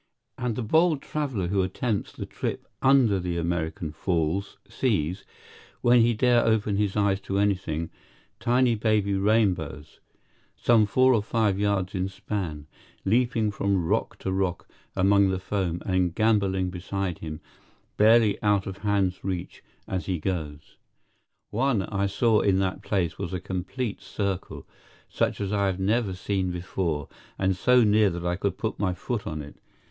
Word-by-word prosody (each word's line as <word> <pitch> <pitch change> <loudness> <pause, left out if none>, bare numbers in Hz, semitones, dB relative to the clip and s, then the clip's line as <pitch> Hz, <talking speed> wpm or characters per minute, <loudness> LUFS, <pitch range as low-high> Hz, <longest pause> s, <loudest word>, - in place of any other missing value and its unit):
And 125 -3 -2
the 125 - -3
bold 160 +6 +3
traveler 130 -12 -2
who 100 0 +2
attempts 100 +3 -2
the - - -7
trip - - -4 0.2
under 130 -7 +4
the 90 -1 -2
American 80 -1 -2
Falls 85 +3 -1
sees, 95 - -1 0.6
when 120 0 +5
he 115 0 +3
dare 120 +1 +4
open 110 -2 +1
his 105 -1 0
eyes 100 -1 +2
to 95 0 -3
anything, 95 -5 0 0.5
tiny 120 +1 +3
baby 105 -2 +1
rainbows, 95 -8 0 0.6
some 115 -3 +4
four 130 +5 +4
or 110 - +3
five 105 -2 0
yards 100 -2 0
in 95 0 -1
span, 90 -7 -4 0.4
leaping 115 0 +2
from 100 -3 0
rock - - -1
to 95 - -3
rock 95 -2 -1 0.3
among 100 +1 +4
the 95 - 0
foam, 95 -3 -2
and 90 -2 +1
gamboling 100 -4 +2
beside 90 0 -3
him, 80 -1 -6 0.6
barely 110 0 +5
out 105 -2 +2
of 95 0 -6
hand's 100 -3 0
reach, 95 -3 -4 0.3
as 95 -1 -3
he 95 -2 0
goes. 75 -5 -4 0.7
One 120 -3 +1
I 100 0 -1
saw 110 +2 +2
in 95 -2 +2
that 95 -1 -1
place 85 -5 -1
was 85 - -4
a 90 - -2
complete 95 +6 -4
circle, 100 -2 -4 0.4
such - - -1
as 100 0 -2
I 100 -1 +2
have 95 -1 -2
never 100 0 +1
seen 95 0 -1
before, 90 -4 -2 0.3
and 95 -1 +1
so 125 +6 +4
near 105 -1 +4
that 85 -1 -5
I 90 0 +1
could 100 +2 -2
put 110 - -3
my 95 -3 0
foot 115 +1 -4
on 75 -1 -4
it. 70 - -13
100 Hz, 160 wpm, -26 LUFS, 90-110 Hz, 0.7 s, when